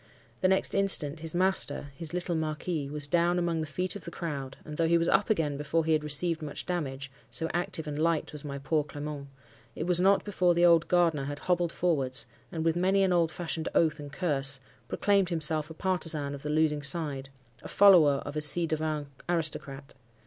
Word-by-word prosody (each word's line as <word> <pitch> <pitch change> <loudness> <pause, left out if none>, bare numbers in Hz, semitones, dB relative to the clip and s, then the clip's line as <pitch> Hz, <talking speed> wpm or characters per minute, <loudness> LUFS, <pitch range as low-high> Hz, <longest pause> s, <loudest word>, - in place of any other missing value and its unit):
The 185 - +4
next 190 0 +2
instant, 170 -6 +2
his 160 +1 -6
master—his 165 -5 -1
little 175 0 -2
marquis—was 155 -2 -3
down 170 +4 +2
among 170 -2 0
the 155 - -4
feet 180 +6 -2
of 200 - -8
the - - -6
crowd, 140 -6 -5
and 150 - -7
though 165 +1 +1
he 170 +1 +4
was 170 0 +1
up 205 - +2
again 155 -9 0
before 155 +3 -1
he 160 - +2
had 155 -1 +1
received 160 +3 0
much 150 -2 -5
damage—so 140 -2 -4
active 175 -2 -2
and 150 -1 -5
light 165 -1 0
was 150 - -7
my 140 -2 -5
poor 145 +2 0
Clement—it 140 -5 -9
was 175 -1 +2
not 195 +2 +3
before 180 -4 +1
the 175 +1 +4
old 170 -1 +5
gardener 165 -6 +2
had 145 +1 -5
hobbled 175 0 0
forwards, 140 -8 0 0.3
and, 160 -1 -3
with 165 0 +2
many 190 +2 +2
an 185 -1 +2
old 170 -2 +2
fashioned 165 -1 -3
oath 155 -2 +2
and 145 -1 -8
curse, 140 -5 0 0.3
proclaimed 200 -3 +1
himself 155 -2 +1
a 160 - -9
partisan 160 -6 -1
of 140 - -8
the 150 - -5
losing 150 -1 +1
side—a 135 -5 -3
follower 165 -9 +5
of 145 - -6
a 150 - -1
ci 160 +3 +3
devant 155 -2 -2 0.2
aristocrat. 145 -5 -2
160 Hz, 190 wpm, -28 LUFS, 145-175 Hz, 0.3 s, old